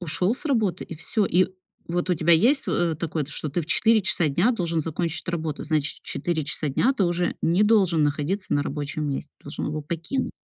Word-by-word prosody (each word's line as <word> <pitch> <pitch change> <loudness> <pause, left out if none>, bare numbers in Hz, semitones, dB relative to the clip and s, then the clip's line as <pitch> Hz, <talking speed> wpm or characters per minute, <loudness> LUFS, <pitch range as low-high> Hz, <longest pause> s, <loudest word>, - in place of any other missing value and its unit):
ушел 180 +5 0
с - - -6
работы, 225 - 0
и - - -8
всё. 205 +7 0
И 185 0 +3 0.4
вот 175 +2 -1
у - - +4
тебя 170 +1 +3
есть, 245 - +4
э, 175 -1 +1
во - - -1
такое, 160 -1 -2
что 155 - -4
ты 160 +5 -1
в - - -10
4 220 +5 +3
часа 175 -3 +1
дня 175 - +3
должен 170 -7 -1
закончить 165 +1 -3
работу, 160 -3 -3
значит, 150 -1 -1
в - - -26
4 165 -3 -2
часа 150 +2 -1
дня 230 - +2
ты 210 -8 +1
уже 175 0 0
не 175 +5 +3
должен 195 -7 +4
находиться 150 +7 -1
на 145 - +2
рабочем 150 +1 -3
месте, 140 +1 -4
должен 145 - -5
его 150 +1 -3
покинуть. 170 - -3
170 Hz, 220 wpm, -25 LUFS, 155-190 Hz, 0.4 s, у